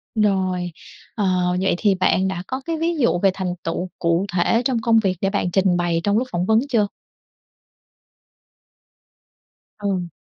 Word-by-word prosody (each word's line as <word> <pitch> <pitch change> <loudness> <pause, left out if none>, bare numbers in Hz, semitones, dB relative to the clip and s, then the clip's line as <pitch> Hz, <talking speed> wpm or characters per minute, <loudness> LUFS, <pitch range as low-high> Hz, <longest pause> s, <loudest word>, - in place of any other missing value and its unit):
Rồi. 190 -4 +1 0.4
Ờ, 205 -3 0 0.3
vậy 190 - +2
thì 200 0 +2
bạn 185 0 +2
đã 190 -2 -3
có 260 +1 -4
cái 330 -1 -2
ví 335 +2 0
dụ 235 -10 +2
về 195 +1 +3
thành 185 -2 -3
tựu 175 +2 -3
cụ 170 +2 +1
thể 185 +6 +2
trong 245 -4 0
công 225 0 +4
việc 190 -4 0
để 195 - +1
bạn 195 -3 -1
trình 190 -1 +2
bày 170 -1 0
trong 205 +1 +2
lúc 255 - 0
phỏng 175 +1 -1
vấn 220 +2 +4
chưa? 220 -6 +2 2.9
Ừ. 190 -4 -2
195 Hz, 165 wpm, -21 LUFS, 180-220 Hz, 2.9 s, công